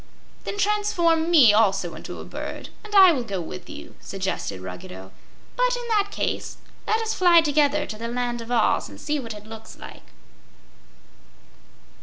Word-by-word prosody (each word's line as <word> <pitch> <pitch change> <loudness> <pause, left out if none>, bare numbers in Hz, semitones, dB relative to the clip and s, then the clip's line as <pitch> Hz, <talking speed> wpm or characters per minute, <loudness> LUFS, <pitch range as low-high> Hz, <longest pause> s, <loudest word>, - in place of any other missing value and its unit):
"Then 405 - -4
transform 365 -6 +1
me, 280 -11 +7
also, 195 -5 +2
into 160 - -8
a - - -8
bird, - - -7
and 425 -1 -7
I 380 -2 +9
will 265 -6 -1
go 200 -5 -4
with 180 +2 -8
you," 310 +2 -10
suggested 190 - -4
Ruggedo. 95 +1 -9 0.4
"But, - - +2
in 485 -1 -6
that 415 -2 +2
case, - - -3 0.3
let 440 - +2
us 445 0 -1
fly 350 -2 +6
together 295 -1 +2
to 215 - -8
the 230 - -4
Land 240 0 -2
of 230 +1 -9
Oz, 235 -3 +2
and - - -12
see 300 0 -2
what 230 -4 -6
it 210 0 -11
looks 220 0 -11
like." - - -12
275 Hz, 170 wpm, -24 LUFS, -, 0.4 s, I